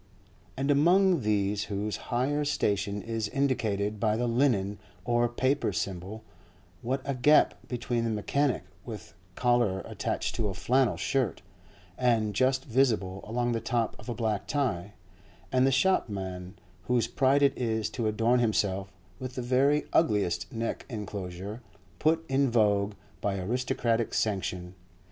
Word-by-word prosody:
And 140 +2 +1
among 175 +3 +4
these 105 -1 0
whose 105 0 -3
higher 135 +5 +1
station 100 -8 0
is 115 -2 -2
indicated 110 -7 0
by 110 0 +1
the 120 - 0
linen 115 -5 +1 0.3
or 120 0 +2
paper 130 +4 0
symbol, 95 +3 -4 0.6
what 130 +3 -1
a 140 - -1
gap 145 +4 +5
between 120 -1 -2
the 115 - 0
mechanic 130 +6 0 0.2
with 110 -7 -8 0.2
collar 120 -6 +2
attached - - -3
to 110 - 0
a 95 - -4
flannel 125 +2 +2
shirt, 125 - -1 0.6
and 115 -4 +2
just 130 +5 +1
visible 110 -7 +1
along 120 +2 0
the 115 -1 -1
top 115 -1 -1
of - - -10
a 120 - -2
black 110 -3 -1
tie, 100 -10 -1 0.6
and 130 +1 +4
the - - +3
shopman 95 - 0 0.3
whose 125 -2 +2
pride 140 +1 +2
it 140 - +4
is 110 -3 -1
to 115 -1 -2
adorn 115 +3 +2
himself 100 -4 0 0.3
with 130 -1 -6
the 125 - -3
very 135 +4 +3
ugliest 100 - +1
neck 115 0 -3
encloser 100 -1 -6 0.4
put 160 +1 +2
in 135 0 +2
vogue 105 -3 +2 0.3
by 100 -1 -1
aristocratic 115 +2 -1
sanction. 90 -4 -1
115 Hz, 140 wpm, -28 LUFS, 100-130 Hz, 0.6 s, gap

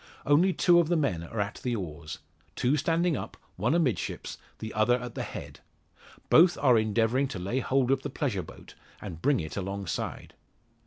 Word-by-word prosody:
Only 160 +7 +4
two 175 -1 +4
of 170 - +2
the 175 - +2
men 135 - 0
are 95 +6 -6
at 105 0 -2
the 125 -2 0
oars; 80 -5 -6 0.4
two 130 +4 +2
standing 165 +3 +1
up, - - -6 0.2
one 120 - +1
amidships, 155 -10 -1 0.2
the 110 0 -6
other 120 +3 +3
at 125 -2 -7
the - - -4
head. - - -7 0.7
Both 175 +2 +6
are 130 -4 +5
endeavouring 115 +4 +2
to 125 - -6
lay 100 +8 -2
hold 130 0 +1
of 135 0 +2
the 145 - -4
pleasure 125 -8 -2
boat, - - -13 0.3
and 85 -6 -8
bring 145 0 +3
it 80 -2 -5
alongside. 100 -2 -4
125 Hz, 180 wpm, -28 LUFS, 100-145 Hz, 0.7 s, Both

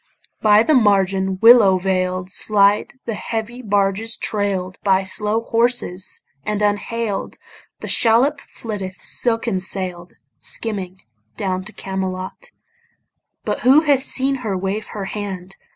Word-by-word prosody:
By 210 0 +5
the 310 - +2
margin, 195 -5 +2
willow 225 -5 +7
veil'd, 185 0 -2
Slide 205 +3 +4
the 230 - -3
heavy 230 +3 -5
barges 205 +1 0
trail'd 195 -3 -2
By 195 -1 +2
slow 210 +3 0
horses; 230 -5 0 0.2
and 210 -1 -2
unhail'd 205 0 -2 0.4
The - - -6
shallop 255 +6 +3
flitteth 195 -4 -7
silken 230 -4 0
sail'd 180 -2 -4 0.3
Skimming 190 0 -3 0.4
down 185 -1 -3
to 215 - -7
Camelot: 190 -2 -5 1.0
But - - -2
who 270 +5 +5
hath 285 -4 +2
seen 270 +1 +1
her 215 -7 -3
wave 195 +3 -3
her 205 -2 -6
hand? 195 -2 -6
205 Hz, 120 wpm, -19 LUFS, 190-230 Hz, 1.0 s, willow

